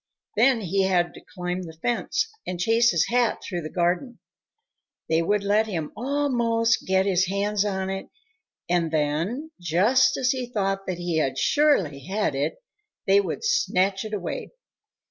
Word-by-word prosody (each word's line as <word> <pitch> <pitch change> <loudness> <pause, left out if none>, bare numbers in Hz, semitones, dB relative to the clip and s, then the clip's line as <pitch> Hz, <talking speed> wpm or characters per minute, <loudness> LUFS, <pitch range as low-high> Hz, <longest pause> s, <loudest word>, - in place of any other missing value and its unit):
Then 260 -4 +4
he 195 0 +1
had 175 -2 +1
to - - -12
climb 180 0 -4
the 160 -3 -9
fence 240 +6 0 0.2
and 180 -1 -4
chase 230 +5 +4
his 170 -6 +2
hat 240 -1 +1
through 175 -2 -4
the 155 - -6
garden. 180 - -1 0.9
They 160 0 +2
would 205 +4 +1
let 210 +2 +2
him 165 -7 -4
almost 235 -3 +1
get 190 0 +3
his 185 -2 +2
hands 200 +1 0
on 190 -2 -2
it 195 0 -5 0.6
and 175 -2 +1
then, 165 - -1
just 205 +11 +3
as 255 -1 +2
he 255 -2 -3
thought 195 -4 -2
that 185 -2 -2
he 175 -3 0
surely 275 - +2
had 200 -3 -1
it, 140 +3 -1 0.5
they 195 +1 +5
would 200 - -4
snatch 195 - +1
it 215 - -7
away. 195 - -5
195 Hz, 160 wpm, -25 LUFS, 175-230 Hz, 0.9 s, they